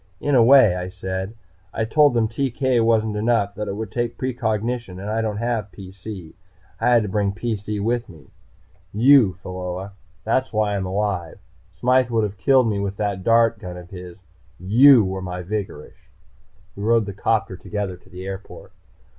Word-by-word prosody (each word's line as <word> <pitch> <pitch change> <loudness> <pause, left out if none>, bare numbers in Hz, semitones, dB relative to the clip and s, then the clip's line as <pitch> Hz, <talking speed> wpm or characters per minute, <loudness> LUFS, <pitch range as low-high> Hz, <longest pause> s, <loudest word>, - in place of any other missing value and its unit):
"In 145 - -1
a 125 -3 +6
way," 120 -6 +6
I 90 0 -4
said. 95 +3 -5 0.4
"I 110 - -2
told 145 +3 +3
them 115 -2 +2
TK 130 0 0
wasn't 110 -2 +2
enough 105 -2 +1
that 105 0 -5
it 100 - -3
would 110 -1 -5
take 120 -1 -3
precognition. 115 -4 -2
And 100 +2 -5
I 110 +1 0
don't 110 -2 -2
have 115 -3 -2
PC. 95 -2 -10 0.5
I 115 - +2
had 120 -2 +4
to - - -3
bring 100 +1 0
a - - -4
PC 105 -1 -3
with 120 +1 -1
me. 80 -7 -16 0.6
You, 120 -3 +6
Pheola. 90 +1 -5 0.3
That's 130 +4 0
why 105 -2 0
I'm 95 -2 -2
alive. 95 -3 -2 0.3
Smythe 125 +8 +1
would 115 -2 +1
have 105 -1 -3
killed 130 +4 +3
me 105 -2 -1
with 100 0 -3
that 100 -3 -2
dart 115 0 +3
gun 90 -2 -8
of 90 0 -12
his. 90 -2 -9 0.4
You 115 +5 +6
were 95 0 -4
my 90 -1 -5
vigorish!" 95 -6 -6 0.7
We 100 - -8
rode 115 +1 +2
the 100 - -6
'copter 110 0 -1
together 100 0 -4
to 95 - -22
the 90 +1 -9
airport. 95 0 -8
105 Hz, 180 wpm, -22 LUFS, 95-115 Hz, 0.7 s, a